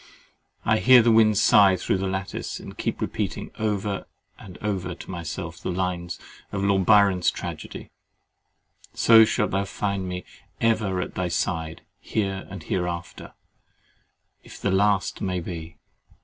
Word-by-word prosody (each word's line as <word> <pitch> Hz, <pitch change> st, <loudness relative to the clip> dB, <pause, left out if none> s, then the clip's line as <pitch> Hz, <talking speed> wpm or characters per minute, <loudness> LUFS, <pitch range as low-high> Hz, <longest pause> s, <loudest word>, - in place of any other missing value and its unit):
I 110 Hz, +1 st, +3 dB
hear 125 Hz, -2 st, +7 dB
the 115 Hz, -, +4 dB
wind 110 Hz, -2 st, +5 dB
sigh 100 Hz, -2 st, +6 dB
through 90 Hz, +1 st, -1 dB
the 95 Hz, -, -1 dB
lattice, 95 Hz, 0 st, -4 dB
and -, -, -10 dB
keep -, -, -3 dB
repeating -, -, -3 dB
over 105 Hz, -2 st, -2 dB, 0.3 s
and 90 Hz, -3 st, -11 dB
over 95 Hz, -4 st, -3 dB
to -, -, -10 dB
myself 85 Hz, -1 st, -5 dB
two -, -, -4 dB
lines 90 Hz, -1 st, -2 dB, 0.3 s
of 100 Hz, -1 st, -2 dB
Lord 95 Hz, -2 st, +2 dB
Byron's 100 Hz, -4 st, +5 dB
Tragedy— -, -, -7 dB, 1.0 s
"So 115 Hz, -1 st, +7 dB
shalt -, -, 0 dB
thou 100 Hz, +1 st, 0 dB
find 100 Hz, -1 st, -3 dB
me 90 Hz, 0 st, -5 dB, 0.3 s
ever 105 Hz, -5 st, +1 dB
at -, -, -5 dB
thy 90 Hz, -, -2 dB
side 80 Hz, -2 st, -2 dB, 0.2 s
Here 95 Hz, -3 st, -3 dB
and 95 Hz, -4 st, -8 dB
hereafter, 85 Hz, -1 st, -4 dB, 1.1 s
if -, -, -12 dB
the 100 Hz, -, 0 dB
last 100 Hz, 0 st, +1 dB
may 90 Hz, -1 st, -1 dB
be." 85 Hz, -1 st, -7 dB
95 Hz, 145 wpm, -25 LUFS, 90-105 Hz, 1.1 s, hear